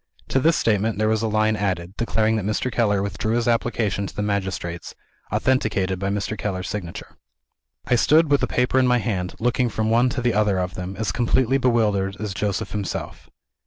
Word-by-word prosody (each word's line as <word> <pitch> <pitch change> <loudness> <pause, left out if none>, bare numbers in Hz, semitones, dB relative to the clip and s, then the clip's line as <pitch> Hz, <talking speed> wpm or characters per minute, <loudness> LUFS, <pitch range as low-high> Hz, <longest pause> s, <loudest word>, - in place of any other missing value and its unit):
To 135 - +2
this 160 +5 +3
statement 110 0 +1
there 110 0 +1
was 110 0 +1
a 115 - 0
line 110 0 +2
added, 95 -3 -2
declaring 110 -1 +1
that 105 - -2
Mr. 110 +4 -1
Keller 105 -5 +1
withdrew 100 +3 -2
his 120 -1 0
application 115 -4 0
to - - -11
the 105 - -2
magistrates; 95 -4 -3 0.4
authenticated 100 -8 +1
by 100 +1 -1
Mr. 100 +2 -2
Keller's 95 -3 -3
signature. 90 -5 -6 0.7
I - - +1
stood 155 +5 +4
with 145 - +4
the - - +1
paper 125 +1 +1
in 130 - +3
my 125 0 +4
hand, 95 -5 -2
looking 120 +1 +1
from 110 0 -1
one 120 +3 +4
to 125 - -3
the 120 -2 +2
other 105 -2 +2
of 90 0 -2
them, 90 +1 -6
as 110 -3 -1
completely 125 +5 +2
bewildered 105 -6 +1
as 105 -2 -3
Joseph 100 +2 -2
himself. 105 -2 -5
110 Hz, 200 wpm, -23 LUFS, 100-120 Hz, 0.7 s, stood